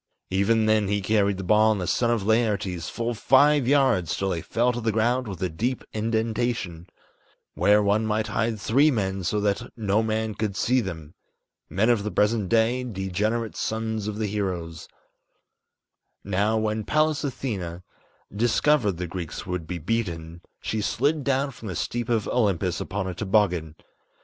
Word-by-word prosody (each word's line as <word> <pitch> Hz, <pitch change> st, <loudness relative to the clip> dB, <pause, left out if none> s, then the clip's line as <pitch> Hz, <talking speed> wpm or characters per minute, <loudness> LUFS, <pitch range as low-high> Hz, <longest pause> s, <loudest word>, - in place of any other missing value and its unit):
Even 110 Hz, +4 st, +2 dB
then 110 Hz, -2 st, +3 dB
he 100 Hz, +1 st, +1 dB
carried 100 Hz, 0 st, +1 dB
the 95 Hz, -, -5 dB
ball 110 Hz, +3 st, +4 dB
and 105 Hz, -, 0 dB
the 90 Hz, -, -2 dB
son 115 Hz, +7 st, +1 dB
of 115 Hz, -4 st, +1 dB
Laertes 100 Hz, -6 st, 0 dB
Full 120 Hz, 0 st, -2 dB
five 135 Hz, +3 st, +4 dB
yards 130 Hz, -, +2 dB
till 95 Hz, -, -1 dB
they 85 Hz, -, -2 dB
fell 120 Hz, +8 st, +1 dB
to 120 Hz, -, -4 dB
the 110 Hz, 0 st, +1 dB
ground 120 Hz, +3 st, +1 dB
with 95 Hz, -2 st, -5 dB
a -, -, +2 dB
deep 115 Hz, +10 st, -2 dB
indentation 110 Hz, -5 st, -2 dB, 0.7 s
Where 105 Hz, +1 st, +4 dB
one 105 Hz, +2 st, +2 dB
might 110 Hz, 0 st, 0 dB
hide 110 Hz, +1 st, -1 dB
three 135 Hz, +10 st, +4 dB
men 95 Hz, -7 st, -1 dB
so 105 Hz, +4 st, 0 dB
that 100 Hz, -1 st, -1 dB
no 105 Hz, -1 st, +1 dB
man 110 Hz, 0 st, -1 dB
could 105 Hz, -2 st, -3 dB
see 125 Hz, +4 st, +2 dB
them 80 Hz, -7 st, -7 dB, 0.6 s
Men 100 Hz, +4 st, +1 dB
of 115 Hz, -4 st, +2 dB
the 105 Hz, -, -3 dB
present 105 Hz, -2 st, +1 dB
day, 115 Hz, +2 st, +2 dB
degenerate 105 Hz, +1 st, -2 dB
sons 110 Hz, -1 st, -2 dB
of 105 Hz, -1 st, -4 dB
the 110 Hz, -, -1 dB
heroes 90 Hz, -6 st, -3 dB, 1.4 s
Now, 100 Hz, +3 st, +1 dB
when 110 Hz, 0 st, -1 dB
Pallas 155 Hz, +5 st, +1 dB
Athene 95 Hz, -, -4 dB, 0.5 s
discovered 120 Hz, 0 st, +2 dB
the 90 Hz, +1 st, -4 dB
Greeks 85 Hz, -1 st, -6 dB
would 90 Hz, -3 st, -4 dB
be 90 Hz, -, -4 dB
beaten, 85 Hz, -3 st, -3 dB, 0.2 s
She 110 Hz, -, -2 dB
slid 140 Hz, +8 st, 0 dB
down 140 Hz, +1 st, 0 dB
from 115 Hz, -3 st, -10 dB
the 90 Hz, -, -4 dB
steep 120 Hz, +7 st, -3 dB
of 115 Hz, -3 st, +1 dB
Olympus 95 Hz, -7 st, 0 dB
upon 95 Hz, 0 st, -3 dB
a 95 Hz, -, -3 dB
toboggan. 95 Hz, -5 st, +1 dB
105 Hz, 170 wpm, -25 LUFS, 95-115 Hz, 1.4 s, ball